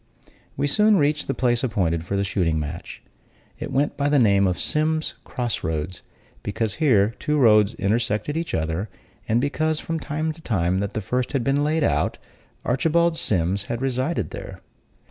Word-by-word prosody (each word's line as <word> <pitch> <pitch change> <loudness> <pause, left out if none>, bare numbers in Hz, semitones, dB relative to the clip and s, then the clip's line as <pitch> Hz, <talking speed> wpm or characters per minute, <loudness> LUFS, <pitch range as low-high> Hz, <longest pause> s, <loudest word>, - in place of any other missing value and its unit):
We 140 - +1
soon 210 +8 +4
reached 150 -1 +1
the 135 - -1
place 120 -1 +1
appointed 90 -9 0
for 100 +3 -2
the 100 - +1
shooting 85 -5 0
match. 75 +3 -6 0.6
It - - -5
went 140 +3 0
by 140 0 +1
the 145 - +3
name 100 -5 +4
of 90 -1 0
Sims's 155 +1 0
Cross 120 -2 -3
Roads, 80 +3 -3 0.4
because 105 0 -2
here 110 -7 +4
two 150 0 0
roads 105 -5 +5
intersected 110 +6 0
each 165 +1 -2
other; 80 +6 -2 0.4
and 115 +2 +3
because, 155 +3 0
from 165 - -3
the 155 +2 -3
time 95 -4 0
that 100 0 -3
the 110 - -2
first 125 +7 -2
had 135 -4 +1
been 140 +3 +1
laid 155 +1 +1
out, - - +1 0.5
Archibald 165 +6 +2
Sims 95 - +1
had 120 - -3
resided 130 +5 -1
there. - - -8
120 Hz, 170 wpm, -23 LUFS, 100-150 Hz, 0.6 s, roads